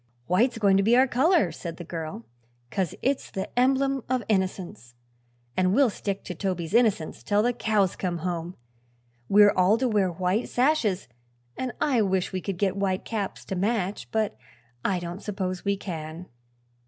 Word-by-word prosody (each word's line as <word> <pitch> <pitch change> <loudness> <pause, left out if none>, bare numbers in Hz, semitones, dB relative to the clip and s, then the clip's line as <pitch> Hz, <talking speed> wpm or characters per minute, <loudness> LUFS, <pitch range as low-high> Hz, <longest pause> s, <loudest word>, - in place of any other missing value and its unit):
"White's 225 - +2
going 200 -3 +4
to - - +4
be 230 +5 +4
our 260 - +6
color," 265 - +3
said 165 +1 -7
the 175 - -7
girl, 160 -8 -6 0.5
"'cause 185 -5 -1
it's 270 +1 0
the 190 - -4
emblem 270 +1 +2
of 255 -2 0
innocence, 185 - -2 0.6
and 185 +1 +2
we'll 265 -3 +4
stick 200 -1 -4
to - - -5
Toby's 175 -1 -3
innocence 220 -9 +2
till 205 0 +2
the 245 +1 +2
cows 210 -5 +1
come 180 -2 -2
home. 175 +1 -4 0.7
We're 205 0 +7
all 185 +4 +4
to 255 +2 +1
wear 205 -5 +2
white 185 +6 -1
sashes, 245 - +1 0.5
and 260 -1 -3
I 260 -6 +2
wish 190 -2 0
we 185 - -2
could 195 -1 -4
get 195 0 +1
white 195 -2 -1
caps 210 -4 -4
to 190 - -4
match; 200 0 -1
but 220 -2 0 0.5
I 190 - +1
don't 175 +2 -6
suppose 185 -3 -3
we 200 0 0
can." 165 -2 -6
195 Hz, 170 wpm, -26 LUFS, 180-225 Hz, 0.7 s, We're